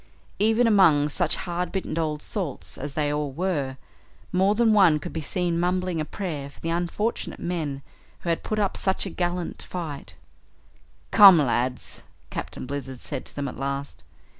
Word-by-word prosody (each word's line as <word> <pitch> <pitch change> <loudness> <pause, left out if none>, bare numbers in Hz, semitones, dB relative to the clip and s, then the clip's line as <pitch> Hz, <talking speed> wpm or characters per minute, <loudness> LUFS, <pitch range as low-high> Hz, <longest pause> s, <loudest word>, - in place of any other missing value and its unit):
Even 225 +3 +4
among 170 -10 +5
such - - 0
hard 175 0 -3
bitten 190 -5 -3
old 155 -2 -2
salts 180 - -4
as 140 +1 -6
they 145 -1 +1
all 150 -1 -2
were, 145 -4 -2 0.5
more 190 +3 +3
than 225 -1 +4
one 190 -7 +6
could 170 +3 -7
be 160 - -3
seen 170 +2 0
mumbling 180 -1 0
a - - -2
prayer 150 -7 -5
for - - -18
the 165 - -3
unfortunate 175 +7 -2
men 155 -6 -3 0.4
who 170 - -3
had 165 - +1
put 215 - -3
up 200 -2 +1
such 190 +1 0
a 190 - -5
gallant 175 0 -2
fight. 150 - -6 1.0
"Come, 195 -4 +10
lads," 125 -3 -1 0.3
Captain - - -5
Blizzard 135 -1 -5
said - - -5
to - - -11
them 145 -1 -2
at 130 - -7
last. 140 +1 -4
170 Hz, 170 wpm, -25 LUFS, 145-185 Hz, 1.0 s, Come